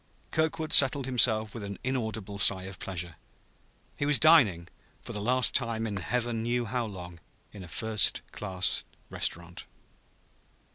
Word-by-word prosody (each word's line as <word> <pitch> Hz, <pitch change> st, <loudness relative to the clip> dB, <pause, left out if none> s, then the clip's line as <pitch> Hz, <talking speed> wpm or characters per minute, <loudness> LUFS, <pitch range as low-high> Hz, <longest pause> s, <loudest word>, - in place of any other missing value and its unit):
Kirkwood 160 Hz, 0 st, -1 dB
settled 135 Hz, 0 st, +5 dB
himself 110 Hz, -4 st, +2 dB
with 115 Hz, -, -7 dB
an 100 Hz, -1 st, -7 dB
inaudible 110 Hz, -6 st, -4 dB
sigh 95 Hz, -3 st, +6 dB
of 95 Hz, 0 st, -10 dB
pleasure. 85 Hz, -5 st, -6 dB, 0.8 s
He 145 Hz, -, -3 dB
was 145 Hz, -2 st, +5 dB
dining, 110 Hz, -, +4 dB, 0.4 s
for -, -, -6 dB
the 105 Hz, -, -4 dB
last 125 Hz, +4 st, +3 dB
time 115 Hz, -2 st, -1 dB
in 105 Hz, -3 st, -4 dB
Heaven 120 Hz, +3 st, -3 dB
knew 120 Hz, +1 st, -2 dB
how 120 Hz, +1 st, -3 dB
long, 90 Hz, -4 st, -10 dB, 0.3 s
in 100 Hz, -, -10 dB
a -, -, -11 dB
first 110 Hz, +4 st, 0 dB
class 95 Hz, -3 st, -1 dB, 0.3 s
restaurant. 85 Hz, +1 st, -5 dB
110 Hz, 145 wpm, -28 LUFS, 95-125 Hz, 0.8 s, sigh